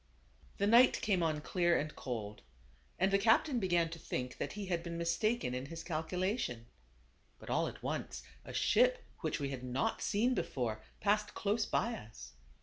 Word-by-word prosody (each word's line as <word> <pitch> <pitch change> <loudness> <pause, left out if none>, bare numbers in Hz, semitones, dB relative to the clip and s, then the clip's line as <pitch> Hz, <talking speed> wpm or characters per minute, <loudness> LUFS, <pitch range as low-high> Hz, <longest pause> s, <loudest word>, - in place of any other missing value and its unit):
The 200 - +1
night 235 +4 +6
came 195 -5 +2
on 155 -2 0
clear 175 +1 +2
and 150 +1 -3
cold, 110 -4 -5 0.6
and 190 +2 +2
the 195 - +5
cap 225 +7 +5
tain 275 -6 -1
began 175 -4 +2
to 165 - -7
think 125 -4 -4
that - - -3
he 205 -1 -5
had 175 -3 -1
been 170 0 -5
mistaken 170 - 0
in 130 +2 -3
his 165 +2 -7
calculation. 170 - -2 0.7
But - - -8
all - - +2
at - - -9
once, - - -3 0.2
a - - -9
ship - - +3 0.2
which - - -2
we 140 - -2
had 130 -2 -5
not 125 +2 -1
seen 235 +5 +2
before, 115 - -2 0.2
passed 210 +1 +1
close 210 +2 0
by 235 - +1
us. 105 - -9
170 Hz, 180 wpm, -34 LUFS, 135-205 Hz, 0.7 s, night